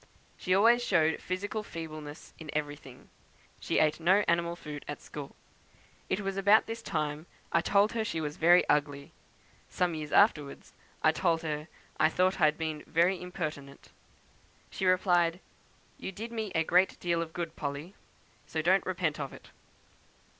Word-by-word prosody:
She 185 -1 0
always 235 +4 +5
showed 160 -7 +2
physical 205 +4 -3
feebleness 155 -5 -8
in 160 -2 -10
everything. 145 -4 -7 0.5
She - - -1
ate 155 +1 +3
no 190 +5 +4
animal 170 0 +1
food 150 -4 -8
at 145 - -5
school. 145 -2 -9 0.7
It 200 - 0
was 195 -1 -3
about 200 +2 +5
this 225 +1 -6
time 155 -4 -3 0.2
I 170 - +3
told 200 +4 +3
her 230 -1 -1
she 165 - -3
was 150 -1 -3
very 175 +2 +5
ugly. 145 -1 0 0.6
Some 180 -2 0
years 155 -2 -5
afterwards, 150 -9 +2 0.3
I 155 - +6
told 165 0 0
her 150 -1 -3 0.3
I 155 - +5
thought 185 +3 +1
I - - +7
had 150 +1 +2
been 155 -2 -4
very 175 +3 +2
impertinent. 155 -6 -6 0.8
She 190 - -2
replied, 180 -2 +3 0.6
'You - - -5
did 225 +5 -7
me 220 -3 -4
a 160 - +3
great 180 +3 +2
deal 170 -1 0
of 165 -1 -5
good, 170 -1 -5
Polly, 145 +5 -5 0.5
so 160 -1 -2
don't 190 +4 +4
repent 175 -5 -1
of 140 -2 -4
it.' - - -14
170 Hz, 160 wpm, -30 LUFS, 150-185 Hz, 0.8 s, I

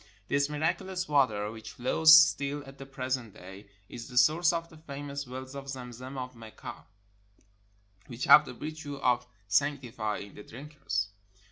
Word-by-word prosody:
This 140 0 +2
miraculous 180 +5 -2
water, 110 -8 +2
which 110 -1 -10
flows 155 +6 +4
still 145 -2 +4
at 135 0 -13
the 135 - -9
present 130 -4 -4
day, 95 +2 -12 0.2
is 120 -1 -8
the 125 -2 -8
source 160 +7 +5
of 165 -1 -3
the 160 - -15
famous 140 -2 -7
wells 130 +1 -8
of 140 0 -8
Zem 125 -2 -6
zem 130 +3 -8
of 125 -1 -6
Mecca, 115 -1 -10 1.2
which 120 0 -7
have 150 - +8
the - - -7
virtue 150 0 -6
of 125 -3 +1 0.2
sanctifying 110 -5 -1
the - - -11
drinkers. 115 -5 -4
135 Hz, 155 wpm, -29 LUFS, 120-145 Hz, 1.2 s, have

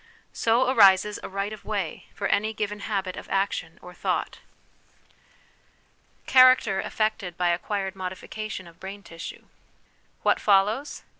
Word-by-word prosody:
So 235 +3 +2
arises 210 -4 +5
a - - -7
right 195 +2 -3
of 215 - -10
way 200 -7 -4
for 200 - -4
any 215 +2 +1
given 210 -1 -3
habit 195 -3 -3
of - - -9
action 195 -4 -1
or 180 - -10
thought. - - -2 1.9
Character 255 -6 +6
affected 215 -5 -2
by 180 -1 +2
Acquired 190 +2 -2
Modification 190 +2 -6
of 170 0 -17
Brain 195 +1 -8
Tissue. 165 -2 -9 0.8
What - - +3
follows? 210 +8 +2
200 Hz, 130 wpm, -26 LUFS, 190-215 Hz, 1.9 s, Character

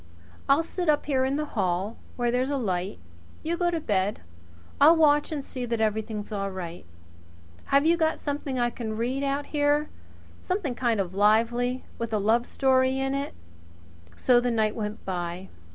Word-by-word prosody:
I'll 285 +4 +5
sit 350 0 -3
up 295 - +2
here 265 -3 +1
in 270 +1 0
the 300 +1 -1
hall, 190 +1 -1 0.2
where 240 -1 0
there's 250 +2 0
a 285 - 0
light. 190 -5 -2 0.5
You 330 +2 -1
get 350 0 +1
to 335 -1 -1
bed. 205 -7 0 0.6
I'll 315 +4 +8
watch 295 -2 +4
and 295 -3 -3
see 255 -2 -6
that 230 -1 -1
everything's 215 0 -2
all 200 -1 -2
right. 175 - -7 0.8
Have 280 +2 +3
you 335 +1 +4
got 320 -1 +1
something 285 -2 -3
I 240 -1 +1
can 220 -3 -5
read 250 +4 -1
out 280 +1 -1
here 295 0 +2 0.5
something 365 -8 -2
kind 235 -3 0
of 185 -2 -2
lively 230 +5 +2
with 230 -1 -3
a - - +3
love 225 +4 +2
story 260 -1 +2
in 270 0 -1
it?" 280 +1 -3 0.8
So 250 -1 +4
the 245 0 0
night 220 -2 +1
went 210 -1 -5
by. 180 0 -4
245 Hz, 180 wpm, -26 LUFS, 215-285 Hz, 0.8 s, I'll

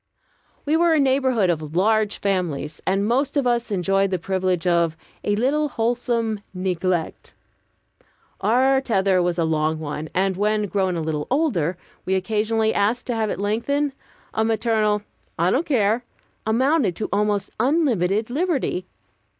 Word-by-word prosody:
We 300 +2 +2
were 335 0 +4
a - - +3
neighborhood 260 -8 +2
of 155 -1 -5
large 215 +2 +2
families, 165 -7 -2
and 195 +2 +1
most 275 +5 +1
of 280 - +1
us 240 -1 +1
enjoyed 195 0 +1
the 185 - 0
privilege 185 -1 -1
of 170 -2 +2 0.3
"a 205 - +1
little 285 +7 +1
wholesome 230 -2 -1 0.2
neglect." 180 -2 -2 1.0
Our 265 +4 +3
tether 195 -7 +2
was 175 0 0
a 170 - +2
long 160 0 0
one, 155 0 -5
and 190 +1 +1
when, 210 +1 +1
grown 190 -2 0
a 165 - -2
little 155 -2 -3
older, 210 - +1 0.3
we 190 - 0
occasionally 220 +3 0
asked 215 +5 0
to 245 - -2
have 220 -1 0
it - - -3
lengthened, 255 +8 0 0.4
a 220 - +1
maternal 220 -2 +1 0.3
"I 170 +3 +2
don't 300 - 0
care" 230 -4 +2 0.4
amounted 250 - +2
to 215 - -3
almost 205 -1 0
unlimited 230 - +1
liberty. 280 - -1
210 Hz, 150 wpm, -22 LUFS, 185-245 Hz, 1.0 s, were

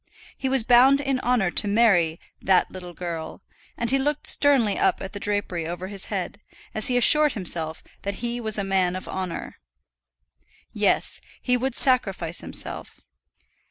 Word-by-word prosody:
He 265 - -3
was 265 -3 +2
bound 255 +4 +5
in 275 -2 -1
honour 240 -8 0
to 205 - +1
marry 195 -7 +2 0.2
"that 185 -1 +2
little 180 -2 -10
girl," 165 -3 -7 0.3
and 235 +1 +2
he 270 - +2
looked 295 +2 -2
sternly 265 -8 +3
up - - +1
at 190 - -8
the 205 - -6
drapery 200 -5 -2
over 175 +2 -6
his 200 -2 0
head, 200 +1 -5 0.3
as 215 - 0
he 250 - +2
assured 300 +4 +5
himself 165 -5 0 0.2
that 200 0 -4
he 240 +2 -4
was 220 -2 +1
a 200 - -1
man 190 -2 0
of 185 - -7
honour. 185 -3 -6 1.2
Yes; - - 0 0.2
he 250 - 0
would 260 +2 -2
sacrifice 195 -10 0
himself. - - -6
205 Hz, 160 wpm, -23 LUFS, 180-250 Hz, 1.2 s, bound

